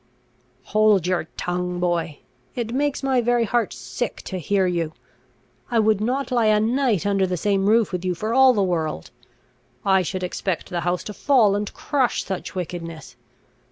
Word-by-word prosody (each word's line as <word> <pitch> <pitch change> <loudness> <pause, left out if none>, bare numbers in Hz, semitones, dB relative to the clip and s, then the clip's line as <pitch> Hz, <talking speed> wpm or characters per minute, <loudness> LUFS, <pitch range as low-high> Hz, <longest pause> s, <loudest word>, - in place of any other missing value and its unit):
"Hold 210 -4 +3
your 180 -2 0
tongue, 180 0 -2
boy! 170 -4 -1 0.3
It 235 -1 -3
makes 285 +1 -1
my 265 -2 +2
very 240 0 +2
heart 235 +1 0
sick - - -5
to 185 - -5
hear 190 +3 +1
you! 170 -3 -1 0.8
I 235 - 0
would 215 -2 +3
not 260 +5 -1
lie 235 -3 +3
a 215 0 +4
night 230 - +1
under 195 -2 +2
the 180 -1 -2
same 195 +1 +1
roof 225 -1 +3
with 180 -1 -3
you 180 -1 -1
for 215 +6 -3
all 265 0 +6
the 200 - +2
world! 160 - -2 0.7
I 190 -1 +4
should 185 +1 -3
expect 180 -1 -3
the 175 -1 -1
house 175 +1 -1
to 210 - -7
fall 230 -6 +3
and 205 0 -2
crush 265 -5 0
such 190 0 -5
wickedness! 165 -3 -6
200 Hz, 175 wpm, -23 LUFS, 180-230 Hz, 0.8 s, all